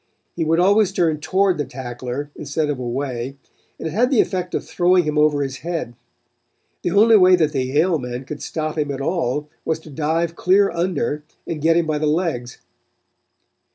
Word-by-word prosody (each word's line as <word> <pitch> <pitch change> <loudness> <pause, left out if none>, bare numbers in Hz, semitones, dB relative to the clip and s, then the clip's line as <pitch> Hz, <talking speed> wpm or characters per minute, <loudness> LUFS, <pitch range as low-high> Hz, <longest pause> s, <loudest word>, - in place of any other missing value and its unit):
He 170 - -1
would 165 +1 +2
always 200 +2 +4
turn 165 -5 +1
toward 185 +4 +1
the - - +1
tackler 125 +2 -6
instead 150 +1 -2
of 140 - -4
away, 125 +1 -4 0.4
and - - -4
it - - -4
had 235 +9 +2
the 265 -5 +2
effect 180 -2 0
of - - -3
throwing 180 0 +3
him 150 -1 -2
over 150 -1 +3
his 135 -1 -4
head. 165 -7 -4 0.9
The - - -1
only 215 +5 +6
way 185 -1 +7
that 160 -4 +1
the 135 -3 -1
Yale 155 +6 +1
men 125 0 -5
could 150 +2 -7
stop 155 0 -3
him 145 -1 -1
at 135 -1 -3
all 150 -2 -1 0.2
was 160 - -1
to 155 - -13
dive 160 +3 -1
clear 195 +3 +3
under 170 -2 -1 0.2
and 160 -3 -4
get 165 +2 +4
him 170 - +2
by 155 -1 -1
the 155 - 0
legs. 150 -7 -1
155 Hz, 190 wpm, -21 LUFS, 140-175 Hz, 0.9 s, way